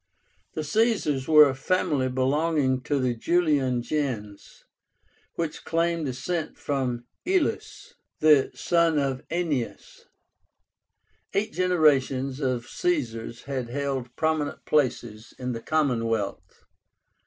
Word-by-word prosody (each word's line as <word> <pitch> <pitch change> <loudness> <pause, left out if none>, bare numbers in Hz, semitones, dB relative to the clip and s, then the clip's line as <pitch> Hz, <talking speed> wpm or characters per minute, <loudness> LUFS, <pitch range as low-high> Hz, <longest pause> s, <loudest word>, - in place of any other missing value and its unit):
The 155 - -2
Caesars 185 - +1
were 150 -2 +8
a 135 - -1
family 140 -1 0
belonging 135 +1 +1
to 145 - 0
the 130 -2 +1
Julian 140 -3 +1
gens, 120 -9 -4 0.7
which 165 -2 -3
claimed 165 -1 0
descent 155 +6 -3
from 125 -4 -2 0.2
IÚLUS, 380 +6 -1 0.3
the 150 -3 +5
son 170 -2 +2
of 135 -2 0
AENÉAS. 155 -8 -3 1.3
Eight 215 +3 0
generations 140 -7 +2
of 130 -4 -1
Caesars 120 -10 -2
had 130 -3 -4
held 135 -2 -3
prominent 155 -2 -1
places 125 -6 -1
in 125 0 -3
the 115 -1 -5
commonwealth. 115 - -1
140 Hz, 105 wpm, -26 LUFS, 125-160 Hz, 1.3 s, were